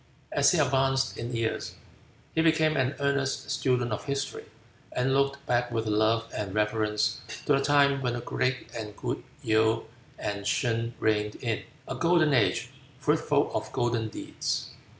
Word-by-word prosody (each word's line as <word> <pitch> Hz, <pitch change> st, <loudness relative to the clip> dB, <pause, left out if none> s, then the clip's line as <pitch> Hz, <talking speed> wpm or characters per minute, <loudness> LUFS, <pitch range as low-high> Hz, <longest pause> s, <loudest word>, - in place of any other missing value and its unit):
As -, -, +4 dB
he 180 Hz, -, +2 dB
advanced 135 Hz, -2 st, +2 dB
in 120 Hz, +1 st, -5 dB
years 115 Hz, -1 st, -2 dB, 0.6 s
he 160 Hz, -, +2 dB
became 155 Hz, -1 st, +3 dB
an 130 Hz, +1 st, +1 dB
earnest 140 Hz, 0 st, 0 dB
student 125 Hz, -3 st, +1 dB
of 105 Hz, -, -4 dB
history, 140 Hz, 0 st, -3 dB, 0.5 s
and 130 Hz, +1 st, +1 dB
looked 140 Hz, 0 st, +1 dB
back 120 Hz, -1 st, +1 dB
with 115 Hz, -1 st, -1 dB
love 110 Hz, +2 st, +2 dB
and 100 Hz, -2 st, -3 dB
reverence 105 Hz, 0 st, +1 dB, 0.2 s
to 145 Hz, -, +3 dB
the 135 Hz, -, +4 dB
time 140 Hz, 0 st, +4 dB
when 125 Hz, -2 st, 0 dB
the 120 Hz, -, -3 dB
great 125 Hz, +1 st, -1 dB
and 105 Hz, -2 st, -6 dB
good -, -, -3 dB, 0.2 s
Yaou 110 Hz, +1 st, +3 dB, 0.3 s
and 100 Hz, 0 st, -3 dB
Shun 115 Hz, +2 st, 0 dB
reigned 105 Hz, -1 st, +1 dB
in: 115 Hz, -4 st, -2 dB, 0.3 s
"A -, -, -3 dB
golden 165 Hz, -3 st, +3 dB
age, 120 Hz, -5 st, +2 dB, 0.3 s
fruitful -, -, +2 dB
of -, -, -3 dB
golden 120 Hz, -2 st, 0 dB
deeds." -, -, -3 dB
120 Hz, 155 wpm, -28 LUFS, 110-140 Hz, 0.6 s, As